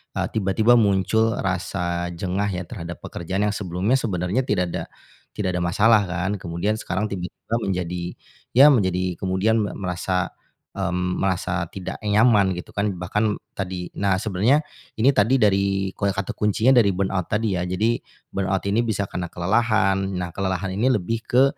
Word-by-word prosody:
eee, - - 0
tiba-tiba 110 +3 +3
muncul 110 +3 +2
rasa 90 -2 -2
jengah 95 +3 -1
ya 90 -1 -3
terhadap 85 -3 -7
pekerjaan 95 +4 -3
yang 105 - -5
sebelumnya 95 +5 0
sebenarnya 95 +2 0
tidak 90 -4 +1
ada - - -3 0.5
tidak 100 -3 -1
ada 90 - -1
masalah 105 +4 +4
kan. 90 +3 -2
Kemudian 85 +6 -1
sekarang 105 - -2
tiba-tiba 95 +4 -4
menjadi, 90 -3 -3 0.4
ya 140 +3 +9
menjadi 95 -7 +1
kemudian 95 +4 +1
me 100 - -3
merasa, 90 0 -2 0.4
mmm, 90 -1 -1
merasa 90 -2 -1
tidak 95 -2 -6
nyaman, 105 -3 +4
gitu 90 - -8
kan, 100 0 0
bahkan 105 +4 0 0.2
tadi. 90 -2 -4
Nah 100 -1 +2
sebenarnya, 110 +9 +2 0.3
ini 125 +5 +5
tadi 110 +5 +3
dari 100 -3 +2
kue 100 - 0
kata 100 - -2
kuncinya 105 +4 +2
dari 100 -3 +4
burnout 95 -1 -1
tadi 105 -2 0
ya, 90 - -1
jadi 110 +6 +1 0.3
burnout 95 -1 -1
ini 115 +3 +3
bisa 100 -2 0
karena 90 -2 -4
kelelahan. 95 0 +1
Nah 90 -2 -3
kelelahan 95 0 -2
ini 115 +7 +2
lebih 115 0 0
ke, 130 +2 +5
95 Hz, 160 wpm, -23 LUFS, 90-105 Hz, 0.5 s, ya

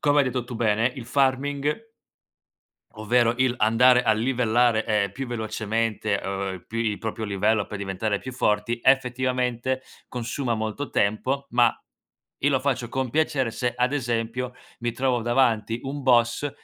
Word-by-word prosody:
come 145 0 +2
hai 140 - +5
detto 125 -1 -2
tu 120 0 -8
bene 110 +1 +2
il 125 - -6
farming 140 +2 +1 1.2
ovvero 115 +2 +2
il 130 -1 +2
andare 125 +3 +5
a 115 - +3
livellare, 120 -1 +2
ehm, 100 -3 +1
più 135 +3 -5
velocemente, 110 -2 -1
Uhm, 95 -2 -4
pi 115 - -5
il 110 -3 0
proprio 110 0 -4
livello 100 +1 +1
per 105 - -6
diventare 100 +1 -2
più 130 - -8
forti, 120 -1 0
effettivamente 130 -1 +1 0.3
consuma 125 0 -2
molto 110 +6 -4
tempo 130 +7 0
ma 120 0 +4 0.7
io 145 - +3
lo 135 -2 +2
faccio 130 -3 -1
con 130 0 -2
piacere 140 -5 +1
se, 120 +1 -2
ad 125 +2 +1
esempio, 120 -1 -2 0.2
mi 120 0 -2
trovo 125 0 0
davanti 115 -2 +1
un 140 +2 -5
boss 120 +2 +3
120 Hz, 150 wpm, -25 LUFS, 110-130 Hz, 1.2 s, hai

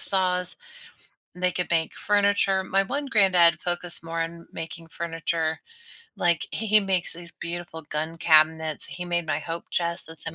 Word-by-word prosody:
saws. 180 -1 0 0.8
They 180 0 +1
could 180 -1 -2
make 165 -1 +1
furniture, 200 -2 +2
my 195 +1 +2
one 280 +8 -3
granddad 185 - +5
focused 175 -1 -4
more 165 0 -2
on 165 - -2
m 170 0 -14
making 165 0 -7
furniture, 165 -1 -2 0.5
like, 170 -2 +1
he 220 - -2
he 215 +1 +7
makes 190 -3 0
these 170 0 -11
beautiful 170 -1 -5
gun 155 +2 -4
cabinets, 160 -1 +3
he 180 - -6
made 175 -1 -1
my 155 0 0
hope 165 +2 -6
chest 170 0 -1
that's 160 0 -8
in 165 - -8
170 Hz, 170 wpm, -26 LUFS, 165-185 Hz, 0.8 s, he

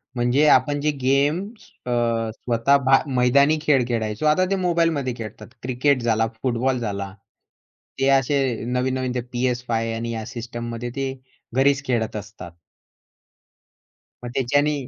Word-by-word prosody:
म्हणजे 125 +5 +2
आपण 145 +3 +3
जे 150 +1 +1
गेम 140 +5 +2 0.5
अ, 125 - -3 0.4
स्वतः 120 +4 +2
भा 135 0 +6 0.2
मैदानी 140 +5 +4
खेळ 145 -5 +3
खेळायचो, 110 +1 -2
आता 155 +5 +4
ते - - +3
मोबाईलमध्ये 165 -7 +1
खेळतात. 110 -2 -8 0.2
क्रिकेट 130 +2 +1
झाला, 115 -1 +1 0.2
फुटबॉल 125 +1 0
झाला, 100 -4 -4 0.9
ते 135 - +2
असे 135 +1 +3 0.3
नवीन-नवीन 130 +1 -1
ते 125 - -1
PS5 120 -2 -1
आणि 115 +1 -4
या 110 -1 -4
सिस्टममध्ये 120 0 -6
ते 135 -1 -2 0.4
घरीच 140 +1 +3
खेळत 115 -4 -1
असतात. 100 -4 -8 1.7
मग 120 - -5
त्याच्यानी 145 +4 +2
125 Hz, 130 wpm, -22 LUFS, 115-140 Hz, 1.7 s, भा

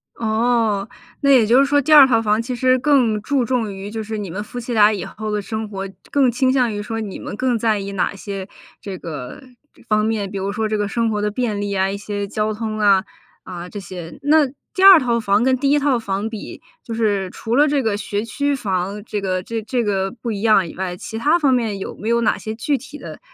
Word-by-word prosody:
哦， 220 -2 +1 0.3
那 280 - +2
也 245 -5 +6
就 240 +4 +4
是 275 - +5
说 285 0 +3
第 310 - -2
2 290 -3 +10
套 225 -3 +3
房 215 0 +1
其 250 +2 -4
实 255 +1 +3
更 250 -6 +2
注 275 +2 0
重 230 -4 -1
于 195 +1 -7
就 220 +1 -5
是 220 +1 -5
你 205 -3 -5
们 195 +5 -4
夫 245 +3 -7
妻 240 +1 -6
俩 215 -1 +5
以 195 -4 -4
后 215 +3 -6
的 210 - -1
生 220 +2 -4
活， 195 -1 -6 0.2
更 270 -4 +3
倾 255 +2 +1
向 250 -4 +2
于 205 0 -4
说 225 +1 -4
你 205 -3 -5
们 - - -6
更 250 0 0
在 220 -2 +1
意 200 0 -5
哪 195 +1 -1
些 195 -1 -6 0.3
这 195 -2 -7
个 150 - -7 0.5
方 215 0 +2
面？ 215 -3 -1
比 195 - -6
如 195 +1 -2
说 220 +1 -1
这 215 - 0
个 205 -1 -1
生 230 +2 0
活 210 -1 -1
的 210 0 -1
便 215 -3 -2
利 205 -1 -2
啊， 190 0 +1
一 200 - -3
些 205 0 -4
交 215 +1 -1
通 215 0 -4
啊， 200 -2 +4 0.4
啊 180 -1 -7
这 205 - -7
些。 175 -3 -9
那 300 +1 +4 0.3
第 380 - +1
2 385 -4 +10
套 235 -2 0
房 205 0 +2
跟 260 0 +3
第 275 +1 +1
1 295 - +4
套 275 -3 +2
房 200 -1 -3
比， 220 -2 -8 0.2
就 230 - -6
是 205 -4 0
除 225 +1 -3
了 295 +3 +5
这 285 -2 +1
个 215 -3 0
学 205 +1 -3
区 285 +5 -1
房 200 -3 -3
这 210 -1 -4
个 185 -2 -1
这 225 +3 -5
这 240 +2 -1
个 195 -2 -1
不 235 -1 -5
一 200 - -4
样 215 -5 +4
以 - - -11
外， 180 -1 -3
其 220 +5 -7
他 300 +9 +2
方 285 -5 +3
面 220 -5 -1
有 - - -6
没 215 - -6
有 235 0 +2
哪 - - +2
些 220 - -5
具 275 +6 -1
体 295 +2 -11
的 - - -9
220 Hz, 260 characters per minute, -20 LUFS, 200-245 Hz, 0.5 s, 2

